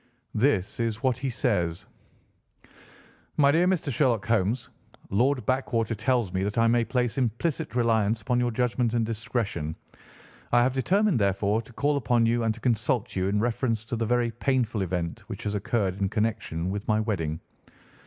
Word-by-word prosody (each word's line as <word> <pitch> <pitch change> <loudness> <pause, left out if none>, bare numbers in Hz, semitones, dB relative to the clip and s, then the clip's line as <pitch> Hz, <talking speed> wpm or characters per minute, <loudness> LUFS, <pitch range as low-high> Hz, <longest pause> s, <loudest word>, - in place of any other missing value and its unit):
This 110 -5 +1
is 115 0 -2
what 130 -2 +3
he 135 +1 -2
says: 100 - -1 1.5
"'MY 140 -1 +5
DEAR 170 +4 +3
MR. 165 -7 0
SHERLOCK 115 -6 +2
HOLMES,—Lord 115 +3 -1
Backwater 120 -4 0
tells 115 -3 0
me 95 - 0
that 100 +2 -2
I 115 - +4
may 120 +1 +3
place 120 0 -1
implicit 125 +1 -1
reliance 115 -2 +2
upon 120 +4 0
your 120 0 +1
judgment 120 0 0
and 115 -1 +2
discretion. 110 -8 -3 0.8
I 120 0 +5
have 130 +1 +1
determined, 185 - +2
therefore, 100 +2 +1
to 115 - -16
call 145 +4 +1
upon 120 -3 +2
you 120 +1 +2
and 115 - +2
to - - -12
consult 120 0 0
you 95 0 0
in 100 +1 +1
reference 115 -1 -1
to 120 - -3
the 115 -1 -1
very 120 0 +1
painful 120 -3 0
event 90 -2 -2
which - - -7
has 105 - -2
occurred 100 -2 -1
in 95 - +1
connection 100 -6 -1
with 100 +1 -5
my 110 0 +2
wedding. 85 -8 -2
115 Hz, 170 wpm, -27 LUFS, 105-125 Hz, 1.5 s, MY